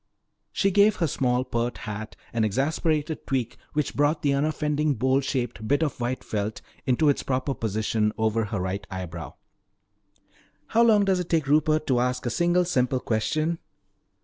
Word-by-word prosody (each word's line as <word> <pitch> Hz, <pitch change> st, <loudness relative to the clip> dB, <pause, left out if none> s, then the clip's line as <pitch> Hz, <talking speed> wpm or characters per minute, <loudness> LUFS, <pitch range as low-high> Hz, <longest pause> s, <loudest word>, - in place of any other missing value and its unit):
She 195 Hz, -, +1 dB
gave 205 Hz, +2 st, +5 dB
her 170 Hz, -, 0 dB
small, 125 Hz, -4 st, +1 dB
pert 120 Hz, -1 st, -2 dB
hat 110 Hz, 0 st, -6 dB, 0.2 s
an 115 Hz, -1 st, +1 dB
exasperated 150 Hz, -, 0 dB
tweak 125 Hz, -3 st, -1 dB, 0.2 s
which 150 Hz, -1 st, -1 dB
brought 145 Hz, +2 st, +1 dB
the 140 Hz, -1 st, +3 dB
unoffending 150 Hz, 0 st, 0 dB
bowl 130 Hz, +2 st, +2 dB
shaped 120 Hz, -5 st, -3 dB
bit 145 Hz, +5 st, +2 dB
of 145 Hz, -5 st, -3 dB
white 125 Hz, +2 st, -2 dB
felt 105 Hz, 0 st, -3 dB, 0.3 s
into 130 Hz, +4 st, +3 dB
its 145 Hz, -, +3 dB
proper 130 Hz, +1 st, -1 dB
position 110 Hz, -1 st, 0 dB
over 110 Hz, 0 st, +1 dB
her 100 Hz, -1 st, -3 dB
right 95 Hz, +2 st, -3 dB
eyebrow. 90 Hz, -4 st, -6 dB, 1.3 s
"How 230 Hz, -, +3 dB
long 215 Hz, -3 st, +5 dB
does 190 Hz, -2 st, +2 dB
it 180 Hz, -, -4 dB
take 160 Hz, -3 st, +2 dB
Rupert 155 Hz, +2 st, +2 dB
to 125 Hz, -3 st, +2 dB
ask 125 Hz, +1 st, -1 dB
a 120 Hz, -, 0 dB
single 175 Hz, +6 st, +2 dB
simple 130 Hz, -6 st, +1 dB
question?" 155 Hz, +9 st, -1 dB
135 Hz, 165 wpm, -26 LUFS, 115-155 Hz, 1.3 s, gave